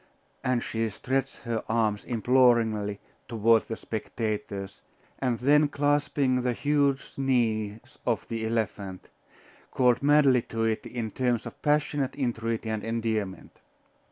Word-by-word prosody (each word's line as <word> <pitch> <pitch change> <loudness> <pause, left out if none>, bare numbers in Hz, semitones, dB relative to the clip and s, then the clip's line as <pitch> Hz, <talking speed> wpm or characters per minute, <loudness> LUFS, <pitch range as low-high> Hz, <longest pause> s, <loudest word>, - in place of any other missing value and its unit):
And 125 -2 +1
she 115 0 -1
stretched 135 +6 -2
her 115 -2 -2
arms 110 -2 +1
imploringly 115 -4 +2 0.3
toward 115 0 +3
the 115 - -3
spectators, 105 -3 -4 0.4
and 125 -3 0
then 145 +5 +4
clasping 145 -2 +1
the 125 0 0
huge 140 0 +1
knees 120 -2 -1
of 115 -4 -1
the 115 -1 -3
elephant, 105 -4 -3 0.6
called 125 -2 +3
madly 140 -3 +5
to 115 0 -3
it 110 -1 -1
in 115 -3 -4
terms 125 -2 0
of - - -9
passionate 145 -2 +1
entreaty 115 -4 -2
and 110 -1 -2
endearment. 110 -4 -3
115 Hz, 125 wpm, -27 LUFS, 110-130 Hz, 0.6 s, madly